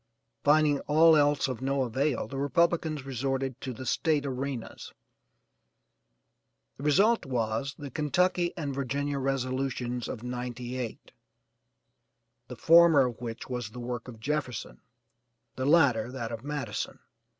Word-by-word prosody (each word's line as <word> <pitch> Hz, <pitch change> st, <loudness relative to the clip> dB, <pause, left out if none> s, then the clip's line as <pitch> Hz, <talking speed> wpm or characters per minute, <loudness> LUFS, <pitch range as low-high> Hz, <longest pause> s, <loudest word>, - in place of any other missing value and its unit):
Finding 150 Hz, -1 st, +4 dB
all 160 Hz, +2 st, +6 dB
else 145 Hz, -1 st, +3 dB
of 130 Hz, -2 st, -5 dB
no 135 Hz, 0 st, 0 dB
avail, 130 Hz, +1 st, -1 dB
the 135 Hz, +4 st, -5 dB
Republicans 160 Hz, -1 st, +1 dB
resorted 135 Hz, 0 st, -2 dB
to 130 Hz, -, -4 dB
the 130 Hz, +2 st, -8 dB
State 150 Hz, +1 st, +1 dB
Arenas; 135 Hz, -2 st, -5 dB, 1.9 s
the -, -, -10 dB
result 205 Hz, +11 st, +4 dB
was 120 Hz, +1 st, -2 dB
the 145 Hz, -2 st, -8 dB
'Kentucky 175 Hz, +5 st, +1 dB
and 145 Hz, -4 st, -3 dB
Virginia 140 Hz, +1 st, -2 dB
resolutions 130 Hz, -2 st, -2 dB
of 115 Hz, -, -6 dB
'98,' 125 Hz, -1 st, -5 dB, 1.4 s
the -, -, -8 dB
former 165 Hz, -4 st, +6 dB
of 120 Hz, -2 st, -5 dB
which 115 Hz, -1 st, -6 dB
was 125 Hz, -4 st, -4 dB
the 125 Hz, -, -10 dB
work 120 Hz, -1 st, -5 dB
of 115 Hz, -3 st, -10 dB
Jefferson, 125 Hz, -, -3 dB, 0.7 s
the 130 Hz, -, -3 dB
latter 130 Hz, -8 st, +4 dB
that 120 Hz, -3 st, -5 dB
of 115 Hz, 0 st, -6 dB
Madison. 140 Hz, -7 st, -4 dB
135 Hz, 130 wpm, -28 LUFS, 125-145 Hz, 1.9 s, all